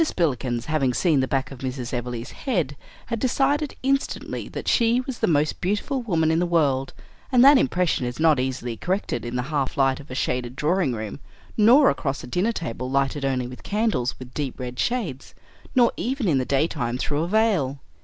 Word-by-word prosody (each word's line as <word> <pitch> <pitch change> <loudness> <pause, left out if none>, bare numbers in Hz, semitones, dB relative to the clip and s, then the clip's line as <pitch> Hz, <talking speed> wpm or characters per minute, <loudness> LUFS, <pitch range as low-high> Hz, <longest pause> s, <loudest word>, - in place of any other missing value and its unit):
Spillikins, 130 - -1
having 135 -5 0
seen 160 -6 +3
the 130 - +1
back 135 +1 -1
of 135 - -9
Mrs. 130 -1 -4
Everleigh's 120 -1 -4
head, 175 - -2 0.3
had 230 -1 -3
decided 275 +4 +1
instantly 275 +1 -1
that - - -7
she 235 0 +3
was 260 -2 -6
the - - +2
most 150 -2 +1
beautiful 210 +8 -1
woman 165 -8 +1
in 160 - +2
the 175 - +1
world; 140 -6 +1 0.4
and 250 0 +6
that 280 -1 +8
impression 180 - +1
is 125 +3 -6
not 155 -4 +4
easily 125 -2 -2
corrected 180 - -2
in 120 +1 -5
the 125 - 0
half 140 -3 -1
light 135 -1 +2
of 145 - -13
a 130 - -6
shaded 125 -1 -2
drawing 155 -1 +1
room; 110 +3 -5 0.4
nor 245 +7 +6
across 140 -2 -3
a - - -8
dinner 180 - +1
table 130 - -4
lighted 140 +1 0
only 130 -2 0
with 125 +1 -9
candles 205 - -1
with 125 -1 -11
deep 140 -4 -4
red 125 -1 -6
shades; 200 - -2 0.4
nor 245 -2 +5
even 255 -2 -1
in 145 -6 +3
the 130 - -1
daytime 135 -4 0
through 145 +3 -1
a 165 - -1
veil. 185 -10 +1
145 Hz, 195 wpm, -24 LUFS, 130-210 Hz, 0.4 s, that